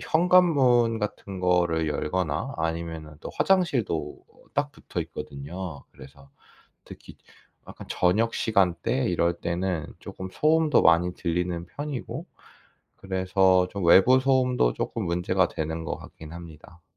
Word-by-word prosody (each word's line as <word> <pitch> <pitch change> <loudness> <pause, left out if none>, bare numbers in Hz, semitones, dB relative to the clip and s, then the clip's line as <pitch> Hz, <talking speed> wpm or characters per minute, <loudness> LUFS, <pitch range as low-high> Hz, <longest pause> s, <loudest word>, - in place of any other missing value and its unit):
현관문 145 -10 +3
같은 100 -2 -5
거를 85 -3 +1
열거나 80 - -2
아니면은 80 -1 -4
또 - - -7
화장실도 125 - 0
어 - - -23
딱 - - 0
붙어 - - -6
있거든요. 75 +2 -8
그래서 70 +1 -15 0.6
특히 - - -13 0.5
약간 - - -10
저녁 105 +6 +1
시간 95 -6 +2
때 125 +2 0
이럴 85 0 +1
때는 85 -1 -2
쪼끔 95 -2 -8
소음도 155 -2 +3
많이 85 +2 +4
들리는 85 0 -2
편이고 140 - -6 0.7
그래서 95 -1 +2
좀 100 -2 -4
외부 95 +10 +6
소음도 125 - +2
쪼끔 - - -3
문제가 90 +2 +1
되는 80 +1 -4
것 - - -3
같긴 80 0 -12
합니다. 85 0 -12
90 Hz, 275 characters per minute, -26 LUFS, 85-115 Hz, 0.7 s, 외부